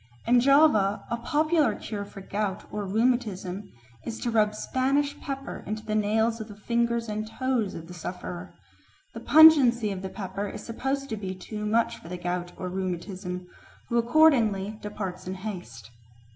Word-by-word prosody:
In 245 +1 +5
Java 255 -7 +4
a 235 - 0
popular 305 +5 +2
cure 205 -2 -5
for 195 - -11
gout 200 0 -3
or 210 -1 -3
rheumatism 210 -4 0 0.3
is 230 - -5
to 240 - -1
rub 215 -1 +2
Spanish 275 +5 0
pepper 275 -1 -6
into 215 +1 -4
the 215 - -2
nails 220 +2 +1
of 215 - -6
the 210 - -10
fingers 235 +2 0
and 215 0 -3
toes 250 -4 -1
of 165 0 -8
the 180 - -9
sufferer; 180 0 -7 0.6
the 230 - -6
pungency 255 -6 +7
of 190 -1 -4
the 190 - -4
pepper 200 +1 -4
is - - -8
supposed 270 +4 -2
to 220 - -3
be 190 -2 -5
too 210 +3 -5
much 230 +2 +1
for 165 - -12
the 180 - -4
gout 175 0 -3
or 185 - -4
rheumatism, 180 0 -4 0.4
who 235 - +2
accordingly 230 -7 +3
departs 200 -4 -5
in 185 - -3
haste. 180 - -7
215 Hz, 170 wpm, -27 LUFS, 190-240 Hz, 0.6 s, pungency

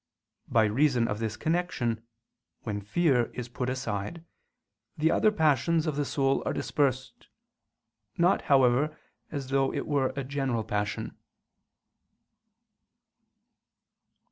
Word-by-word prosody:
By 110 - +4
reason 120 +2 +2
of 105 - -3
this 110 -1 -3
connection, 145 -7 -1 0.6
when 105 -2 -3
fear 125 - +2
is 125 -2 -4
put 125 +1 -3
aside, 130 - -4 0.7
the 160 +1 +2
other 215 - +4
passions 160 - +2
of 155 -3 -1
the 145 0 0
soul 135 -1 +1
are - - -1
dispersed; 130 -3 -1 0.9
not, 175 +3 +3
however, 140 +3 +4 0.3
as 140 -3 -5
though 135 0 +2
it - - -3
were 140 -3 +1
a 140 - -2
general 130 -4 -1
passion. 105 0 -3
135 Hz, 115 wpm, -28 LUFS, 115-150 Hz, 0.9 s, By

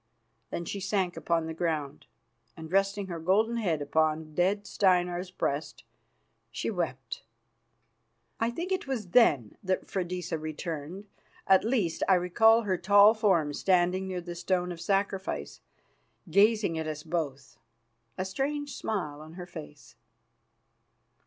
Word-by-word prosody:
Then 170 - -4
she 200 - -4
sank 190 -2 -1
upon 165 -1 0
the 160 - -4
ground, 155 -4 -3 0.5
and 160 0 -9
resting 195 +1 +1
her 175 -3 -5
golden 215 +8 +2
head 170 -10 0
upon 155 +1 0
dead 195 +5 +1
Steinar's 180 -2 +1
breast, 150 -4 -3 0.7
she - - -3
wept. 145 - -4 1.2
I 230 - +1
think 335 +10 -5
it 375 -6 -1
was 230 -8 -3
then 145 - +4
that 185 -1 -1
Freydisa 180 -3 -3
returned; 155 +4 -5 0.4
at 190 -1 +5
least, 215 -8 0
I 190 - +7
recall 220 +6 +4
her 190 -4 -1
tall 205 +3 +7
form 185 -9 +2
standing 185 +2 +2
near 185 -1 -3
the 175 0 -7
stone 180 +1 -1
of 170 -1 -7
sacrifice, 195 0 -2 0.7
gazing 205 -3 +3
at 160 - -3
us 155 -1 -5
both, 140 -8 -4 0.6
a 185 - -2
strange 285 +8 -3
smile 155 -9 -3
on 155 +1 -11
her 180 0 -7
face. 75 - -11
180 Hz, 135 wpm, -29 LUFS, 160-200 Hz, 1.2 s, I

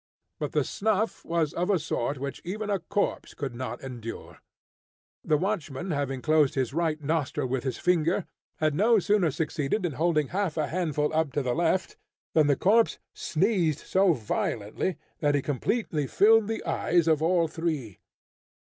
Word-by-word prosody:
But - - -3
the - - +2
snuff 220 +1 -1
was 165 -2 0
of 180 +3 -1
a 200 - +4
sort 145 -3 -2
which 140 +1 -5
even 205 +4 -3
a 200 - +1
corpse 200 +4 -2
could 140 -4 -4
not 130 +2 -5
endure. 120 -4 -8 0.8
The 155 -3 +2
watchman 180 -3 -2
having 135 -3 -2
closed 155 -3 +3
his 130 -2 -1
right 160 -1 0
nostril 150 -3 -1
with 130 0 -2
his 130 -4 -2
finger, 175 +1 +1 0.3
had 155 -1 +1
no 220 +8 +4
sooner 205 -3 +2
succeeded 155 +5 -1
in 170 - 0
holding 155 0 +1
half 190 -4 -1
a 155 - +1
handful 155 -4 -1
up 160 -2 +1
to 145 - 0
the 125 -1 0
left, 170 +3 0 0.4
than 155 -2 +4
the 140 - +4
corpse 220 - +3 0.2
sneezed 170 -3 0
so 190 -2 +4
violently 115 - -2 0.2
that 145 -1 +2
he 140 - +2
completely 150 - -1
filled 220 +4 +5
the 225 0 -3
eyes 170 -1 +1
of 155 -2 +3
all 170 0 +3
three. 155 - -3
160 Hz, 165 wpm, -27 LUFS, 140-185 Hz, 0.8 s, filled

